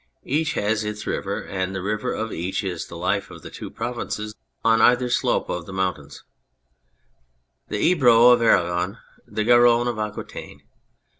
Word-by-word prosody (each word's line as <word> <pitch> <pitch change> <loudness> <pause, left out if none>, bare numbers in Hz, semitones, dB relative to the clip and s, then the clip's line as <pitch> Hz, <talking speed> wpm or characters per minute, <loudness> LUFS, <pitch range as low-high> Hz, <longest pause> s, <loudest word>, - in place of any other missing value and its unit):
Each 155 +4 0
has 105 +1 0
its 105 0 -5
river, 100 +2 -3
and 95 0 -3
the 95 - -3
river 105 +5 -2
of 110 0 -3
each 90 +5 -3
is 90 -4 -4
the 85 - -9
life 90 +4 -1
of - - -12
the - - -9
two - - -8
provinces 105 -3 -4 0.3
on 115 0 +4
either 125 0 +4
slope - - +1
of 85 -1 -4
the 95 - -8
mountains; 90 -7 -3 1.4
the - - -3
Ebro 125 -5 +5
of 120 -1 +4
Aragon, 90 -6 +2 0.3
the 110 - -2
Garonne 120 +1 +5
of 120 -3 -2
Aquitaine. 105 -1 -6
105 Hz, 160 wpm, -23 LUFS, 95-120 Hz, 1.4 s, Ebro